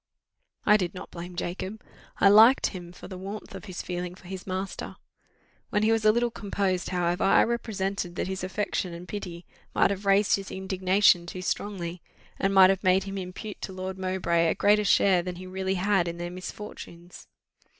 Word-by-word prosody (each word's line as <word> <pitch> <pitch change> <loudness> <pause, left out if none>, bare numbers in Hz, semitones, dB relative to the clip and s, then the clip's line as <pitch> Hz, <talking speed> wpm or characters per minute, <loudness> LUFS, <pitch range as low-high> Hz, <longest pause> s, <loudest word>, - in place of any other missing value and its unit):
I 210 0 +6
did 180 -2 -3
not - - -9
blame 175 +1 -8
Jacob 185 +4 -4 0.4
I - - +6
liked 220 +6 +7
him 175 -2 -8
for 180 - -11
the 185 -1 -8
warmth 200 +3 -7
of - - -8
his 185 -3 -6
feeling 180 0 -4
for 185 - -18
his 190 +1 -7
master. 190 +1 -4 0.7
When 210 0 +1
he 220 - +4
was 225 -1 +2
a 215 - +6
little 235 +1 +1
composed, 195 -4 -2
however, 175 -1 0
I - - +5
represented 195 -6 -2
that - - -2
his 190 0 -4
affection 185 -2 -2
and 175 +1 -10
pity 180 -4 -6 0.3
might - - +4
have 200 0 -4
raised 195 +1 +4
his 195 -1 -7
indignation 190 -1 +2
too 185 +1 -6
strongly, 180 -3 -3 0.4
and 195 - +1
might 190 -1 +7
have 195 +1 -2
made 185 0 +4
him 195 0 -5
impute 185 +3 -7
to 190 - -5
Lord 185 0 -5
Mowbray 180 -3 +1
a - - +1
greater 210 +1 +3
share 190 -2 +4
than 180 0 -5
he 185 +1 -9
really 190 +1 -2
had 190 -1 +2
in 170 0 -4
their 175 0 -5
misfortunes. 180 -1 -9
190 Hz, 190 wpm, -27 LUFS, 180-200 Hz, 0.7 s, liked